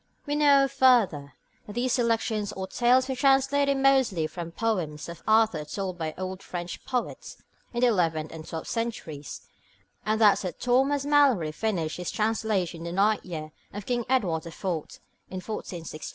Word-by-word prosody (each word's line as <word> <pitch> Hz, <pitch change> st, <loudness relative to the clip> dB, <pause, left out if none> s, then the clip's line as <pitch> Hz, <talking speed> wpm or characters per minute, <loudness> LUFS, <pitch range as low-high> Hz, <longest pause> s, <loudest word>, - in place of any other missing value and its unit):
We 290 Hz, -1 st, -1 dB
know, 285 Hz, -2 st, +5 dB
further, 240 Hz, -, +3 dB, 0.3 s
that 205 Hz, -, -8 dB
these 245 Hz, +2 st, 0 dB
selections 225 Hz, -4 st, 0 dB
or 190 Hz, -, -4 dB
tales 250 Hz, +6 st, +3 dB
were 265 Hz, -, -2 dB
translated 275 Hz, +1 st, +3 dB
mostly 265 Hz, -11 st, +3 dB
from 165 Hz, +2 st, -6 dB
poems 170 Hz, -8 st, -2 dB
about 170 Hz, -1 st, -9 dB
Arthur 220 Hz, -6 st, +4 dB
written 185 Hz, +5 st, -4 dB
by 160 Hz, -3 st, -4 dB
old 185 Hz, +1 st, -5 dB
French 175 Hz, -1 st, -6 dB
poets 250 Hz, -2 st, -4 dB, 0.3 s
in 240 Hz, -, -3 dB
the -, -, +5 dB
eleventh 165 Hz, -8 st, +1 dB
and 160 Hz, -1 st, -8 dB
twelfth 160 Hz, -, -6 dB
centuries, 190 Hz, -, -4 dB, 0.6 s
and 215 Hz, +1 st, 0 dB
that 210 Hz, -3 st, +6 dB
Sir 185 Hz, -, -4 dB
Thomas 270 Hz, +3 st, +1 dB
Malory 275 Hz, -, +4 dB
finished 170 Hz, -3 st, -2 dB
his 180 Hz, -1 st, -4 dB
translation 215 Hz, -6 st, -1 dB
in 165 Hz, -, -7 dB
the 170 Hz, -, -4 dB
ninth 205 Hz, +3 st, +2 dB
year 155 Hz, -3 st, -6 dB, 0.2 s
of 205 Hz, 0 st, -6 dB
King 245 Hz, -1 st, -1 dB
Edward 190 Hz, -12 st, +1 dB
the 165 Hz, -, -9 dB
Fourth 165 Hz, -2 st, -4 dB, 0.3 s
(1469). 180 Hz, -5 st, -6 dB
210 Hz, 165 wpm, -27 LUFS, 170-250 Hz, 0.6 s, that